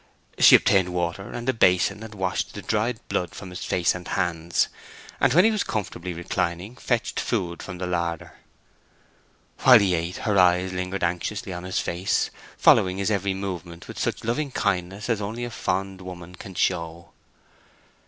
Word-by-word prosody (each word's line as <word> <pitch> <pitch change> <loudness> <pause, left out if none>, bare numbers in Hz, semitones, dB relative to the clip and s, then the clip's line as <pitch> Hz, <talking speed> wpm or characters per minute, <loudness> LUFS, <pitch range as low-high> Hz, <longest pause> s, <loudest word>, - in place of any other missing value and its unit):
She - - +9
obtained 95 -2 +4
water 85 +3 -2
and 120 +1 -6
a 130 - +3
basin, 90 -2 +3
and 110 -1 -9
washed 95 -2 -2
the - - -7
dried 110 +2 0
blood 90 -2 -2
from 95 -3 -8
his 90 - -6
face 90 -2 +1
and 90 0 -8
hands; 85 -1 0 0.5
and - - +4
when 175 - +6
he 225 - +5
was 215 -2 0
comfortably 90 -4 -4
reclining, 85 +4 -3
fetched 120 -2 -1
food 90 -7 -2
from 95 -2 -7
the 90 - -3
larder. 85 -2 -2 1.3
While 125 -2 +8
he 100 -4 +2
ate 85 +1 -2
her 105 -3 +3
eyes 90 +1 +4
lingered 90 +1 -3
anxiously 90 +3 -2
on 90 0 -6
his 95 - -3
face, 90 +3 0 0.3
following 95 0 +5
its 100 +2 0
every 100 -1 0
movement 90 -4 -6
with - - -8
such - - -2
loving 140 +6 -1
kindness 100 -3 -2
as 115 -4 0
only 110 +4 -4
a 120 - -6
fond 95 -3 -2
woman 90 -1 -9
can 95 +1 -10
show. 85 -1 -1
95 Hz, 175 wpm, -25 LUFS, 90-105 Hz, 1.3 s, She